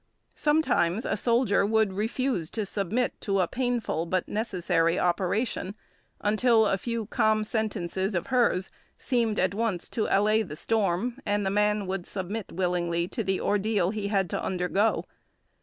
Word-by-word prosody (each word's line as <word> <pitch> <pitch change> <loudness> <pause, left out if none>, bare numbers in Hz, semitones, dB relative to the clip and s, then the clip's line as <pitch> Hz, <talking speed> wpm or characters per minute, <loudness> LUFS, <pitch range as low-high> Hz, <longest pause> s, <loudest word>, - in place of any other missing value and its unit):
Sometimes 280 - +1
a - - 0
soldier 230 -2 +2
would 215 -1 +2
refuse 215 -3 -1
to 215 -2 -3
submit 210 +5 -2
to 195 -2 0
a 180 - +2
painful 240 - -1
but 185 +1 -1
necessary 175 -6 0
operation 190 +3 0 0.5
until 220 +2 +3
a 195 -2 +1
few 230 +1 -3
calm 215 +1 +2
sentences 200 -3 -2
of 175 - -1
hers 230 -7 +2 0.3
seemed 235 -5 0
at 185 +1 +2
once 210 -4 -1
to 220 - -1
allay 215 +2 +3
the 165 -8 -6
storm, 220 - 0
and 205 0 0
the 190 - 0
man 210 0 +2
would 185 -1 -4
submit 200 +2 -5
willingly 175 -1 0
to 230 - -3
the 190 -1 0
ordeal 205 -2 +1
he 210 -2 -3
had 195 -2 +1
to - - -2
undergo. 190 +4 0
205 Hz, 155 wpm, -27 LUFS, 185-225 Hz, 0.5 s, until